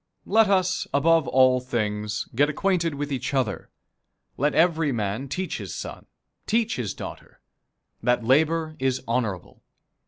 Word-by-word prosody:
Let 220 0 +4
us, 185 -2 +1
above 165 +2 +3
all 130 0 +4
things, 105 -4 -2
get 145 +5 +3
acquainted 170 -1 0
with 145 +1 -4
each 135 +1 -2
other. 125 -7 -1 0.7
Let 145 +3 0
every 165 -3 +3
man 110 +2 -2
teach 185 +5 -3
his - - -6
son, - - -7 0.4
teach 225 +1 +1
his 115 -6 -3
daughter, - - -9 0.6
that 125 -1 +1
labor 155 +4 +2
is 130 -1 0
honorable. 110 -6 -2
140 Hz, 135 wpm, -25 LUFS, 125-165 Hz, 0.7 s, Let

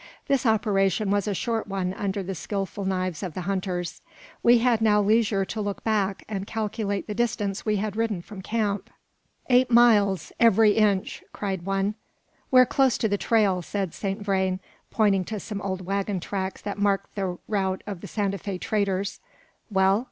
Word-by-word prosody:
This 275 -3 +2
operation 205 -2 +2
was 205 0 +1
a 205 - 0
short 225 +2 -2
one 190 -2 -2
under 195 0 -2
the 195 +1 -4
skilful 195 +2 -4
knives 185 -3 -1
of 180 -6 -5
the 185 - -3
hunters. 180 -2 -3 0.4
We 240 +1 +6
had 235 -1 +2
now 210 -1 +4
leisure 210 -1 +2
to 215 +2 -4
look 205 -1 -4
back, 200 -3 0
and 200 -2 -4
calculate 210 -2 -2
the 210 - -4
distance 215 -3 -1
we 210 - +2
had 205 0 -2
ridden 220 -6 -1
from 200 -1 -9
camp. 205 -1 -1 0.6
"Eight 250 0 +4
miles, 215 -5 +4
every 225 -2 +6
inch!" 205 -2 +1
cried 190 -3 -4
one. 195 +1 0 0.6
"We're 255 -1 +7
close 265 -1 +2
to 220 - +1
the 205 -1 -1
trail," 205 -5 +2
said 190 0 -3
Saint 200 +1 -3
Vrain, 190 -2 0 0.3
pointing 200 -4 +2
to 215 +2 -4
some 205 0 -6
old 190 -2 -4
waggon 195 0 -1
tracks 190 +1 -4
that 205 0 -4
marked 200 -1 0
the 190 -3 -3
route 190 -3 -1
of 200 -5 -6
the - - -7
Santa 200 -2 -1
Fe 195 +1 -4
traders. 200 -1 -1 0.5
"Well?" 195 0 +3
200 Hz, 175 wpm, -25 LUFS, 190-215 Hz, 0.6 s, We're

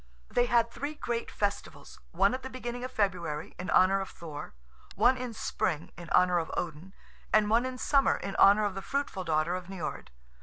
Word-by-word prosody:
They 245 0 +2
had 235 -1 +3
three 285 +5 -5
great 235 -5 -3
festivals, 205 -1 -4
one 195 +6 +2
at 260 - -3
the 260 - -7
beginning 245 -1 -5
of 255 - -5
February, 170 -8 -1
in 180 - -5
honour 195 +1 +4
of 195 - -5
Thor, 150 - -9 0.4
one 240 +5 +4
in 250 -1 -5
Spring, 160 -7 -2
in 170 -1 -10
honour 180 -1 +4
of 165 - -4
Odin, 175 +3 -5 0.4
and 215 -1 +4
one 235 +3 +3
in 255 -1 -6
Summer, 275 +1 +3
in 195 - -5
honour 205 +2 +6
of 205 - -1
the 195 - -5
fruitful 275 -6 -3
daughter 160 0 +1
of 180 -1 -4
Niord. 190 -5 -5
200 Hz, 195 wpm, -29 LUFS, 175-245 Hz, 0.4 s, honour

